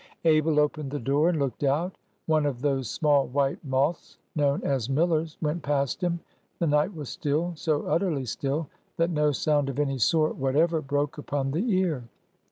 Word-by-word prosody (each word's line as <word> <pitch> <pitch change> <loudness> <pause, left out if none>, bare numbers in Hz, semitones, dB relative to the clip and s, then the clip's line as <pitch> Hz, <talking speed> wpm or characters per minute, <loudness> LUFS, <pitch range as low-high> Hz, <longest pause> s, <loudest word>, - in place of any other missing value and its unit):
Abel 155 -1 +4
opened 150 -1 0
the 145 - -3
door, 140 +7 +2
and 175 - 0
looked 140 -1 -2
out. 155 +7 +1 0.3
One 155 -2 +2
of 125 -4 -3
those 135 -4 0
small 145 -3 +2
white 135 +1 0
moths 140 +4 -1 0.2
known 145 -2 +1
as 130 -3 -1
"millers" 160 +2 +1
went 155 +3 -1
past 140 +2 -1
him. 170 -1 -1 0.4
The 170 - 0
night 150 +5 +2
was 150 -4 -6
still,—so 155 0 -1
utterly 155 -4 0
still 140 +6 -2 0.3
that 165 +1 +2
no 150 -2 +2
sound 145 0 +1
of 135 - -5
any 135 -2 0
sort 155 +8 +2
whatever 155 +5 +2
broke 145 +1 -1
upon 140 -2 -2
the 185 - -1
ear. 160 -10 0
150 Hz, 175 wpm, -27 LUFS, 140-160 Hz, 0.4 s, Abel